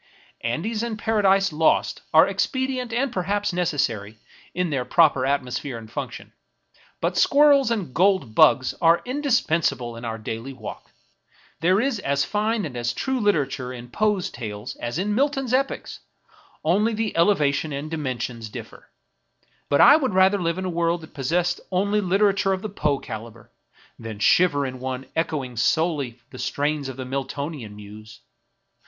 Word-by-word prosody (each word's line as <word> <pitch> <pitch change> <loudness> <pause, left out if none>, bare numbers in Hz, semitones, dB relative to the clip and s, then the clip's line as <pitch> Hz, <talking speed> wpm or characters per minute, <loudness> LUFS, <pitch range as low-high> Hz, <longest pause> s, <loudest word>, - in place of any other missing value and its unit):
Andes 195 - -2
and 235 -2 -3
Paradises 195 -4 +2
Lost 160 +1 +2
are - - +7
expedient 260 -2 -1
and 250 +2 -1
perhaps 200 +2 -1
necessary 120 - -1 0.3
in 180 -2 -1
their 135 -3 0
proper 135 0 +3
atmosphere 135 -2 -2
and 110 -1 -11
function; - - -6 0.7
but - - 0
Squirrels 285 -3 +5
and 200 - -2
Gold 185 - +2
Bugs 130 +3 +5
are 165 +1 +4
indispensable 170 - 0
in 115 - -9
our 115 -1 -3
daily 115 +4 -6
walk. 120 -5 -9 0.7
There 180 +5 +3
is 250 -2 0
as 140 -5 0
fine 215 0 0
and 140 -5 -7
as 120 -1 -1
true 265 -1 -2
literature 145 - 0
in 120 -1 -9
Poe's 210 -1 0
Tales 110 +1 -6
as 120 +4 -4
in 205 +3 -1
Milton's 270 0 0
epics; 270 +1 -1 0.6
only 210 +8 +2
the 220 -1 -2
elevation 160 -4 +2
and 145 +3 -5
dimen 135 -6 -3
sions 115 -2 -5
differ. - - -10 0.8
But 140 - +4
I 290 - +9
would 260 -10 -1
rather 190 +1 +4
live 170 0 -1
in 185 - -3
a - - -1
world 170 0 0
that 160 - -13
pos 135 -3 -5
sessed 175 +2 +1
only 200 +3 +1
literature 195 0 +2
of 185 - -4
the 215 - -3
Poe 150 -7 0
caliber, 110 -2 -9 0.5
than 115 -2 -7
shiver 145 - +3
in 130 -1 -6
one 130 0 -4
echoing 140 -7 -2
solely 140 -1 0
the 130 - -10
strains 145 -1 -1
of 130 - -8
the 130 - -5
Miltonian 135 -3 -5
muse. 105 +1 -12
160 Hz, 160 wpm, -23 LUFS, 130-205 Hz, 0.8 s, I